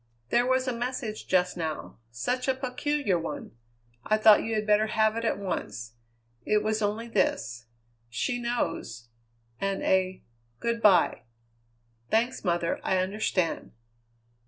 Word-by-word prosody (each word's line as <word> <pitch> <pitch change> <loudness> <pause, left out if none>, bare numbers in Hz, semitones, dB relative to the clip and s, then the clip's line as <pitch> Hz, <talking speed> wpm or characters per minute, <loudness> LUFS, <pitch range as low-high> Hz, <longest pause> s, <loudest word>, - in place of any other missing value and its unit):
"There 245 +1 +3
was 260 0 +2
a 255 - 0
message 235 -2 -4
just 180 -1 +2
now. 160 -7 -5
Such 250 - -2
a 265 - +2
peculiar 260 - 0
one. 235 - -5 0.5
I 215 - +2
thought 215 -1 +7
you 225 0 -2
had 215 0 0
better 210 +1 +4
have 220 0 +2
it 230 - -2
at 225 - +1
once. 120 - -4 0.5
It 210 0 +2
was 215 0 0
only 215 +3 -1
this: 115 - -1 0.4
'She 245 - -1
knows' 120 - -3 0.5
and 195 0 -1
a 185 0 +1 0.4
'good 235 0 -1
bye.'" 190 -6 +5 0.9
"Thanks, 235 +4 +1
mother. 170 -2 0
I 190 - +1
understand." 185 -2 -1
215 Hz, 135 wpm, -28 LUFS, 185-235 Hz, 0.9 s, thought